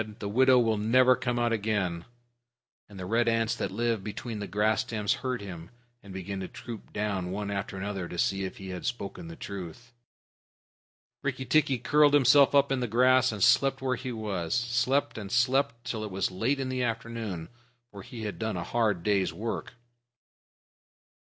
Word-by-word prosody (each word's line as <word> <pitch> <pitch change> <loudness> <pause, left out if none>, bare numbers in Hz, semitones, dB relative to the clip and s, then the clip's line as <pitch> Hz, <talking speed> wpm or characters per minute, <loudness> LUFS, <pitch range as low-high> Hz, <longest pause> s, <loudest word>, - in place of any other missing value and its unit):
"The 105 - -5
widow 130 +5 +5
will 115 -3 +2
never 125 +4 +5
come 120 -1 -2
out 120 -1 +1
again." 100 -6 -1 0.8
And 100 - -12
the 90 - -5
red 115 +5 +1
ants 115 -1 +2
that - - -2
live 115 0 -1
between 110 +1 -5
the 100 - -4
grass 105 0 +1
stems 110 0 -1
heard 130 -3 -2
him, 85 -4 -8 0.3
and 100 - -12
began 95 +1 -5
to 95 - -4
troop 115 -4 -9
down 100 -4 -2
one 100 +2 -3
after 100 -1 -4
another 95 -2 -4
to 90 - -7
see 95 +2 +1
if 95 - -5
he 95 -1 -8
had 90 -1 -5
spoken 120 - -5
the 165 - -8
truth. 100 - -8 1.3
Rikki 130 - -3
tikki 145 -2 +3
curled 145 +3 +4
himself 140 +1 +6
up 140 -1 +4
in 135 - +1
the 125 - -1
grass 130 +3 +4
and 105 -3 -2
slept 135 +1 +4
where 130 -1 0
he 125 +1 -5
was 105 -5 -2
slept 125 +2 +1
and 100 -2 -7
slept 125 -1 +1
till 110 -2 -3
it 105 - -4
was 95 -1 -1
late 115 +10 0
in 130 -1 -2
the 130 0 -2
afternoon, 115 -7 -3 0.4
for 100 - -9
he 115 +3 -8
had 105 -2 -5
done 110 -4 -2
a 85 - -3
hard 105 -6 0
day's 100 -5 +2
work. 115 +7 -5
110 Hz, 185 wpm, -28 LUFS, 100-125 Hz, 1.3 s, himself